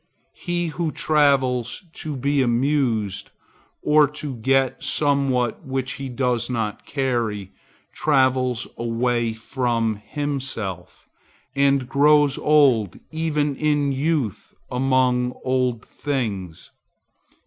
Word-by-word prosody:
He 175 -1 -2
who 160 0 -2
travels 135 -6 +1
to 150 -2 -5
be 140 +2 +1
amused, 120 -5 0 0.5
or 150 0 +5
to 150 -2 -5
get 135 +3 +1
somewhat 135 -5 +1
which 130 -1 -3
he 135 -1 -5
does 125 -1 -1
not 110 -4 -3
carry, 120 -8 -2 0.4
travels 130 -4 +1
away 120 0 0
from 115 -2 -1
himself, 130 - -5 0.5
and 140 -2 +2
grows 145 +1 +4
old 130 - +3
even 150 -3 -1
in 145 -1 +1
youth 135 - -2 0.2
among 125 -1 +1
old 125 -3 0
things. 105 - -4
130 Hz, 95 wpm, -22 LUFS, 120-145 Hz, 0.5 s, or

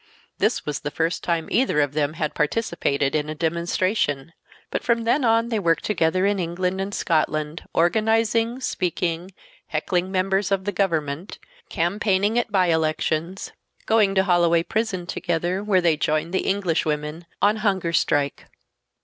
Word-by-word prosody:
This - - +1
was 150 -1 -2
the - - -4
first 165 +3 -1
time 165 -2 -1
either 250 - +2
of 145 -1 +1
them 150 0 0
had 155 -2 -2
participated 150 -5 0
in 150 0 -1
a 155 - -4
demonstration. 170 -2 -1 0.4
But - - -1
from 235 -1 +1
then 255 +5 +2
on 230 0 +3
they 225 -3 0
worked 165 -4 +1
together 185 -1 +1
in 200 0 +1
England 180 +2 -1
and 195 +1 -3
Scotland 155 -3 -1
organizing, 225 +6 +2
speaking, 180 -4 -2 0.4
heckling 185 0 -1
members 195 +1 0
of 190 -1 0
the 205 - 0
government, 165 -3 -2 0.3
campaigning 200 +5 +1
at 235 - -3
bye 185 -3 +3
elections; 160 +3 -1 0.3
going 210 -3 +3
to 190 - +4
Holloway 170 -3 +3
Prison 210 -3 -2
together, 175 +2 -2
where 195 -3 +3
they 165 -3 +2
joined 155 +3 -1
the 190 - 0
Englishwomen 165 -4 -1
on 210 +2 +3
hunger 190 -6 0
strike. 145 -3 0
180 Hz, 150 wpm, -23 LUFS, 160-200 Hz, 0.4 s, to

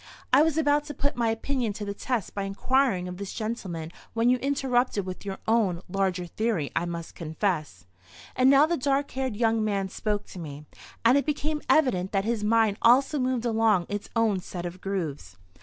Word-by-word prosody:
I 270 - +8
was 320 0 +2
about 295 -1 +3
to 295 -1 -7
put 285 - -1
my 235 -1 +1
opinion 230 0 -1
to 205 +1 -5
the 200 - -3
test 230 -1 -3
by 200 - -3
inquiring 195 0 +1
of 180 0 -6
this 200 0 -5
gentleman 185 -8 -4 0.2
when 230 +1 +3
you 255 - +3
interrupted 255 -6 0
with 185 +2 -7
your 195 -1 -4
own—larger 190 -4 0
theory, 190 -4 -1
I 175 - +1
must 170 -1 -6
confess." 160 - -3 0.5
And 255 +1 +5
now 280 +2 +7
the 340 +2 0
dark 280 +1 0
haired 260 -4 -2
young 225 0 +2
man 200 -2 -1
spoke 210 +1 -2
to 185 - -9
me, 150 -2 -8 0.4
and 250 +5 +6
it - - -3
became 300 +1 -1
evident 195 -12 +3
that 195 0 +1
his 225 -2 -1
mind 220 -1 +3
also 265 +5 +4
moved 255 -2 0
along 220 -5 +2
its 205 0 -4
own 220 -4 +2
set 175 -1 -7
of 175 +1 -7
grooves. 150 - -4
215 Hz, 190 wpm, -27 LUFS, 185-255 Hz, 0.5 s, I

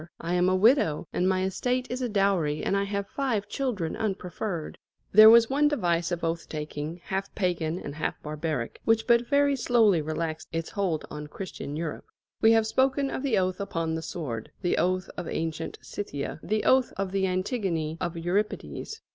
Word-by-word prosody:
I 170 +1 -3
am 180 +1 +3
a 185 - +3
widow, 185 - +3
and 180 +1 +2
my 185 0 +1
estate 250 +7 -1
is 255 +1 -3
a 250 - -1
dowry, 195 -8 +1
and - - +1
I 200 0 +1
have 200 0 -2
five 240 -8 -1
children 225 - -2
unpreferred." 190 -4 -4 0.3
There 215 +2 +10
was 230 0 +7
one 290 +4 +3
device 175 - +1
of 175 -1 -3
oath 165 0 -2
taking, 155 +2 -5
half 195 +1 -4
pagan 175 -4 0
and 145 -5 -6
half 155 - -3
barbaric, 150 -5 -3
which 225 0 +2
but 235 0 +4
very 285 0 +3
slowly 225 -8 +3
relaxed 155 +1 -3
its 165 0 -3
hold 185 -6 -1
on 150 0 -6
Christian 150 -3 -6
Europe. 160 -1 -4 0.4
We 225 - +6
have 225 -1 +4
spoken 270 +4 +1
of - - -3
the 275 -3 +1
oath 185 0 0
upon 165 -5 -2
the 160 - -2
sword 140 -9 -5
the 175 - +1
oath 185 +2 +1
of 175 - -4
ancient 160 0 -3
Scythia, 145 -8 -5
the 215 0 -1
oath 260 -1 +4
of 195 -1 -2
the 195 0 +1
Antigone 185 - -1
of 175 -1 -2
Euripedes. 205 - -2
185 Hz, 185 wpm, -27 LUFS, 165-220 Hz, 0.4 s, There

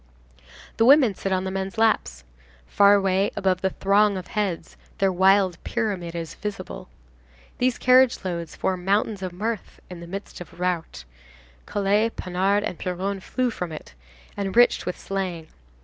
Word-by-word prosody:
The 225 - +4
women 265 -4 +6
sit 195 +1 -4
on 185 0 +1
the 190 - -3
men's 195 +3 -4
laps. 65 - +1 0.4
Far 200 - +5
away, 195 0 +2
above 190 -1 0
the 190 - +1
throng 200 +1 +2
of 185 - -8
heads, 195 -6 -3 0.2
their 195 -1 +2
wild 190 -1 +3
pyramid 195 -7 -3
is 165 -1 -5
visible. 210 0 -7 0.7
These 250 0 +1
carriage 255 -4 +4
loads 170 -3 -4
form 185 -1 -2
mountains 200 +1 0
of 185 -1 -4
mirth 215 +5 -4
in 180 - -8
the 170 - -10
midst 195 +1 -8
of 175 - -9
the - - -18
rout. 175 - -3 0.6
Collé, 205 +2 +1
Panard 190 +3 0
and 180 - -4
Piron 190 +2 -3
flow 250 +6 -2
from 180 -6 -5
it, 155 - -9 0.4
enriched 200 +5 +2
with 180 - -3
slang. 185 -5 -4
195 Hz, 160 wpm, -24 LUFS, 180-205 Hz, 0.7 s, women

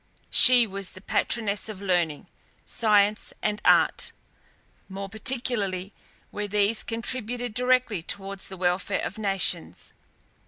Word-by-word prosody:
She 250 -2 +8
was 195 -2 -5
the - - -12
patroness 210 +1 -2
of 210 -3 -8
learning, 175 -6 -1 0.4
science, 210 -2 +1
and 210 0 -2
art, - - +2 0.8
more 195 +1 -6
particularly 210 -4 -2 0.4
where 210 0 -4
these 205 +2 +1
contributed 245 0 -3
directly 250 -5 +1
towards 195 +2 -3
the 190 - -9
welfare 180 0 -1
of 200 - -7
nations. 195 - -1
205 Hz, 115 wpm, -25 LUFS, 195-230 Hz, 0.8 s, She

